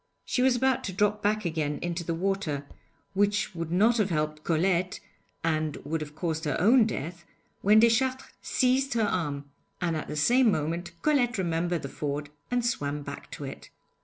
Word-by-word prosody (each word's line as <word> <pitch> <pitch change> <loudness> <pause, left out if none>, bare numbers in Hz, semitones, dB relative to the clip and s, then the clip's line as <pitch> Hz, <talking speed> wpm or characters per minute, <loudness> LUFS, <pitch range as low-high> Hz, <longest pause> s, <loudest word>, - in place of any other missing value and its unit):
She 250 - 0
was 260 -1 +4
about 260 +1 +2
to 190 - -4
drop 210 +2 +1
back 215 0 +1
again 155 -3 -1
into 175 0 -2
the 165 0 -2
water, 170 -6 -1 0.5
which 205 +1 +1
would 165 -1 -4
not 220 +7 +4
have 210 -3 +2
helped 155 -2 -1
Colette 180 +2 +1 0.4
and 155 -2 0
would 160 +1 -2
have 150 -1 -7
caused 160 -1 -2
her 145 - 0
own 225 +5 +6
death, 170 -2 -5 0.4
when 210 +2 +6
Deschartres 255 +3 +3
seized 260 +1 +1
her 225 - +2
arm; 150 -8 -1 0.3
and 170 -2 0
at 155 - -4
the - - -5
same 240 - +4
moment 170 +2 -2
Colette 250 -6 +2
remembered 170 -2 0
the - - -3
ford 145 +1 -4 0.2
and 245 -1 0
swam 145 -10 -1
back - - -8
to - - -7
it. - - -8
175 Hz, 180 wpm, -28 LUFS, 155-220 Hz, 0.5 s, own